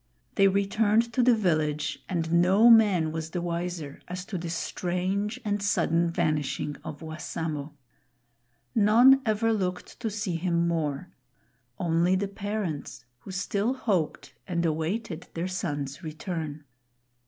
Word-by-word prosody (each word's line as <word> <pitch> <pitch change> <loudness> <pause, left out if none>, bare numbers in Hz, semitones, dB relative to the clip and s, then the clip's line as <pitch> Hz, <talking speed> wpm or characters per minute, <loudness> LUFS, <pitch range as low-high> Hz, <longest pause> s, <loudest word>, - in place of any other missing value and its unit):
They 195 - +5
returned 210 +4 +2
to 250 - +2
the 245 -1 +5
village, 155 -7 0
and 165 -3 -1
no 200 +7 +6
man 200 -8 +5
was 160 0 -4
the 175 - -3
wiser 170 -3 -4
as 180 +1 -5
to 195 - -4
the 170 0 -5
strange 185 +6 -2
and 205 -1 0
sudden 170 -4 +2
vanishing 150 -4 -1
of 150 - -7
Wassamo. 155 -2 -4 1.0
None 240 +5 +6
ever 220 +1 +2
looked 185 -4 -3
to 230 -2 -2
see 205 -5 -2
him 170 0 +1
more; 160 0 -2 0.7
only 170 +2 +2
the 200 +1 0
parents, 195 - -4
who 195 - -13
still 200 +5 -1
hoped 200 - -1
and 170 -2 0
awaited 165 +3 -2
their 170 +2 -2
son's 145 -5 -3
return. 155 -2 -5
180 Hz, 130 wpm, -27 LUFS, 160-205 Hz, 1.0 s, no